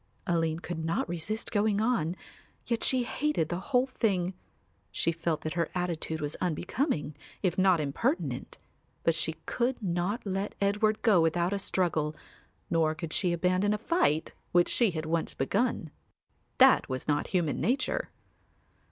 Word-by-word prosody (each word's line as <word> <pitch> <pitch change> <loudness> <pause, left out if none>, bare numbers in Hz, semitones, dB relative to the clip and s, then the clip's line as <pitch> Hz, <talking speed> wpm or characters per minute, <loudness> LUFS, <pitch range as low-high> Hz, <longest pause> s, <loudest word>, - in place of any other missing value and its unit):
Aline 165 -1 0
could 165 -3 -4
not 165 +1 0
resist 175 +6 -3
going 210 -1 +2
on, 210 -8 +1 0.5
yet 235 -2 -1
she 255 -2 +2
hated 250 - 0
the 175 - -2
whole 250 -2 +4
thing; 195 -8 0 0.6
she 165 - +1
felt 165 -1 -2
that 155 - -3
her 170 -2 0
attitude 165 -3 -2
was 145 0 -3
unbecoming, 175 - -1 0.3
if 185 - +2
not 185 -2 +4
impertinent; 190 - -1 0.5
but 165 - +3
she 160 0 -1
could 250 +1 0
not 190 +3 -1
let 195 +1 -2
Edward 210 +2 +1
go 205 -7 +5
without 170 +3 +1
a 200 - -1
struggle, 160 -6 0 0.5
nor 160 -2 +2
could 160 0 -5
she 180 -3 +2
abandon 185 +4 +2
a - - -2
fight 210 - +1 0.2
which 175 0 +4
she 235 -3 +3
had 160 -3 -4
once 165 +1 -1
begun; 165 - 0 0.7
that - - +6
was 130 0 -3
not 145 -1 +1
human 175 -5 0
nature. 260 - 0
180 Hz, 150 wpm, -29 LUFS, 160-215 Hz, 0.7 s, that